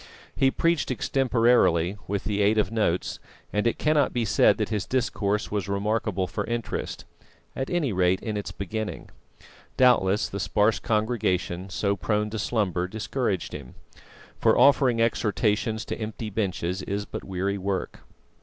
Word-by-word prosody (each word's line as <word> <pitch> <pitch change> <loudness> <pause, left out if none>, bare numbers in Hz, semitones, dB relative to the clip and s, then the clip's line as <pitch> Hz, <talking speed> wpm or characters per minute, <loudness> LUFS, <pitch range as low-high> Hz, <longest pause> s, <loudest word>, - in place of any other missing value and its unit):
He 135 - +4
preached 165 +3 +1
extemporarily, 120 -9 +2
with 100 0 -2
the 105 -1 -1
aid 105 +2 +3
of 105 -2 +1
notes; 105 -6 0 0.3
and 105 +2 +1
it 115 - 0
cannot 150 -2 +2
be 120 -2 0
said 100 - +4
that - - -1
his 105 -4 -2
discourse 105 -5 -1
was 100 -2 -2
remarkable 100 -1 0
for - - -3
interest, 120 -1 -4 0.5
at 135 - -3
any 160 - 0
rate 90 0 +2
in 110 -2 -4
its 105 - -4
beginning. 105 +2 -5 0.7
Doubtless 105 -5 +4
the 100 - -5
sparse 105 +3 +2
congregation, 95 -5 -1
so 100 +2 0
prone 105 +4 -1
to 110 - -3
slumber, 95 -7 0
discouraged 110 -1 -2
him; 65 -3 -9 0.6
for - - +4
offering 135 -4 +5
exhortations 110 -1 0
to - - -3
empty 110 0 -5
benches 95 -3 -2
is 100 +1 -3
but - - -7
weary 95 +1 -2
work. 95 0 -3
105 Hz, 150 wpm, -26 LUFS, 95-115 Hz, 0.7 s, offering